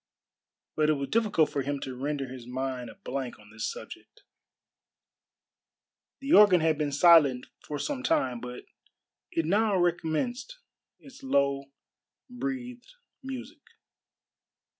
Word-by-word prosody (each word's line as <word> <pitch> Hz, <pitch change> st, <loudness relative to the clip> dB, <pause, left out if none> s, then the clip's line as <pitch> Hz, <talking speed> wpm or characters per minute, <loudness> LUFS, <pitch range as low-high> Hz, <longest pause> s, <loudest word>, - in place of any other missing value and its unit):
But 155 Hz, 0 st, +2 dB
it -, -, +5 dB
was 140 Hz, -2 st, -4 dB
difficult 210 Hz, -9 st, +2 dB
for 140 Hz, -, -1 dB
him 140 Hz, +1 st, -3 dB
to 130 Hz, -, -5 dB
render 140 Hz, +1 st, -3 dB
his 125 Hz, -2 st, -10 dB
mind 130 Hz, -1 st, -4 dB
a -, -, -12 dB
blank 130 Hz, -1 st, -5 dB
on 105 Hz, 0 st, -18 dB
this 110 Hz, -, -3 dB
subject. -, -, -11 dB, 2.0 s
The 275 Hz, +3 st, 0 dB
organ 205 Hz, -4 st, +8 dB
had 160 Hz, -1 st, +1 dB
been 150 Hz, -2 st, 0 dB
silent 145 Hz, -4 st, +5 dB, 0.2 s
for 150 Hz, -, -5 dB
some 280 Hz, -, -3 dB
time, 250 Hz, -, 0 dB
but 125 Hz, 0 st, -8 dB, 0.6 s
it 165 Hz, -, -1 dB
now 205 Hz, +3 st, +2 dB
recommenced 175 Hz, -, -1 dB, 0.4 s
its 270 Hz, -1 st, -15 dB
low 140 Hz, -, +1 dB, 0.7 s
breathed 250 Hz, -, -6 dB, 0.3 s
music. 265 Hz, +3 st, -8 dB
160 Hz, 125 wpm, -28 LUFS, -, 2.0 s, organ